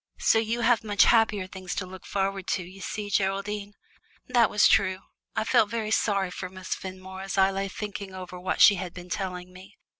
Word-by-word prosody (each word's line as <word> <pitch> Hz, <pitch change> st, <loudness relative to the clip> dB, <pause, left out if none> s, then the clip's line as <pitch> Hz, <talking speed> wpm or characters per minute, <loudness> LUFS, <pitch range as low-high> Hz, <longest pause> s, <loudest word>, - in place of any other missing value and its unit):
So 225 Hz, -, +3 dB
you 225 Hz, +2 st, -1 dB
have 235 Hz, -1 st, +3 dB
much 205 Hz, -2 st, +4 dB
happier 215 Hz, -4 st, +3 dB
things 185 Hz, -1 st, -7 dB
to 190 Hz, -, -2 dB
look 185 Hz, 0 st, -11 dB
forward 195 Hz, -1 st, -2 dB
to, 185 Hz, -, -1 dB
you 185 Hz, +3 st, -12 dB
see, 205 Hz, +3 st, -5 dB
Geraldine." 200 Hz, +1 st, -1 dB, 0.5 s
That 240 Hz, -3 st, +4 dB
was 210 Hz, -, +5 dB
true. 190 Hz, -2 st, +2 dB, 0.3 s
I 220 Hz, -, +1 dB
felt 220 Hz, -1 st, +3 dB
very 220 Hz, -1 st, -3 dB
sorry 200 Hz, -4 st, +1 dB
for 185 Hz, 0 st, -6 dB
Miss 185 Hz, 0 st, -5 dB
Fenmore 190 Hz, 0 st, -8 dB
as 195 Hz, 0 st, -5 dB
I 190 Hz, 0 st, +5 dB
lay 195 Hz, 0 st, -2 dB
thinking 200 Hz, -1 st, -6 dB
over 180 Hz, -1 st, -8 dB
what 185 Hz, -, -2 dB
she 205 Hz, -, +9 dB
had 180 Hz, -1 st, -6 dB
been 180 Hz, -1 st, -10 dB
telling 180 Hz, -1 st, -4 dB
me. 190 Hz, +3 st, -14 dB
195 Hz, 205 wpm, -27 LUFS, 185-210 Hz, 0.5 s, she